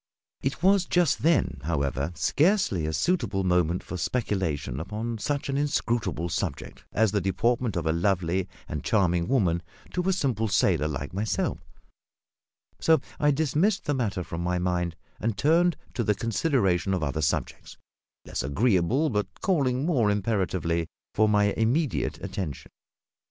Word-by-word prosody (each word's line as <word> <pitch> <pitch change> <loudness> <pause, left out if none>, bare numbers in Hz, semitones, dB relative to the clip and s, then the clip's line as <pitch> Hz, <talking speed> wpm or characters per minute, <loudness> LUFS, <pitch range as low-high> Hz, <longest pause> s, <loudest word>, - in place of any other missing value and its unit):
It 135 +5 -3
was 190 -1 +5
just 175 -4 +2
then, 150 - +2
however, 70 -1 -1
scarcely 135 - +2
a - - -1
suitable 110 - 0
moment 90 -1 +1
for 90 - -6
speculation 90 - -1
upon 110 +6 -4
such 140 +5 -2
an 135 0 -1
inscrutable 120 - 0
subject 85 - -4
as 110 -2 +2
the 100 -1 +1
deportment 115 +5 0
of 85 -2 -2
a 80 - +2
lovely 90 +1 0 0.2
and 75 - -4
charming 90 -5 +2
woman 95 -10 +2 0.3
to 180 - 0
a - - +4
simple 130 - 0
sailor 90 -6 +2
like 75 +1 -4
myself; 105 +3 -1 1.2
so 160 -2 +4 0.2
I 145 - +3
dismissed 160 +7 +1
the 145 - +1
matter 105 -8 -1
from 85 0 -5
my 90 +1 0
mind 90 -1 -1 0.2
and 110 -2 -1
turned 170 - +3 0.2
to 120 - -1
the 105 -1 +1
consideration 100 - +1
of 90 - -2
other 75 +1 -1
subjects, 75 - -2 0.5
less - - -3
agreeable, 110 - +2
but 105 -2 0
calling 140 -8 +1
more 130 -11 +2
imperatively 95 -5 0 0.3
for 110 0 +3
my 105 -1 +3
immediate 125 +7 0
attention. 80 -9 -5
105 Hz, 145 wpm, -27 LUFS, 85-135 Hz, 1.2 s, was